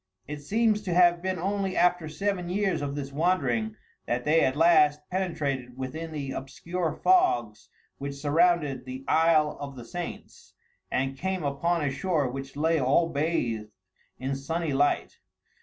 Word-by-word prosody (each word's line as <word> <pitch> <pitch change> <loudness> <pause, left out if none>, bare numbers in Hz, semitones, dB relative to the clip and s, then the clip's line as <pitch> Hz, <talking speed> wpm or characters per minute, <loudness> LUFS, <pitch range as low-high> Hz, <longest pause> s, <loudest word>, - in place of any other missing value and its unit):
It 145 +1 -7
seems 215 +6 +1
to 180 -4 -2
have 175 -1 +5
been 185 0 -2
only 195 +1 -1
after 175 -2 +2
seven 185 +1 -2
years 195 -1 0
of 140 -1 -3
this 140 -1 -5
wandering 135 -9 0 0.3
that 120 +1 -1
they 160 +2 +4
at 130 - +2
last 155 -2 +5
penetrated 145 -9 -2
within 155 +5 -5
the 140 -3 -4
obscure 165 +6 -3
fogs 120 - +2 0.3
which 140 0 -4
surrounded 150 -1 +2
the 130 +1 -7
Isle 160 -2 +3
of 140 -1 -6
the 120 -2 -9
Saints, 175 +7 -8 0.3
and 135 +1 -1
came 190 -2 -2
upon 155 +4 0
a 140 - 0
shore 150 0 0
which 135 +1 -7
lay 160 +2 +2
all 145 +6 +3
bathed 140 -9 -1 0.5
in 130 +1 -3
sunny 160 +3 -2
light. 145 +2 +1
155 Hz, 155 wpm, -27 LUFS, 135-175 Hz, 0.5 s, have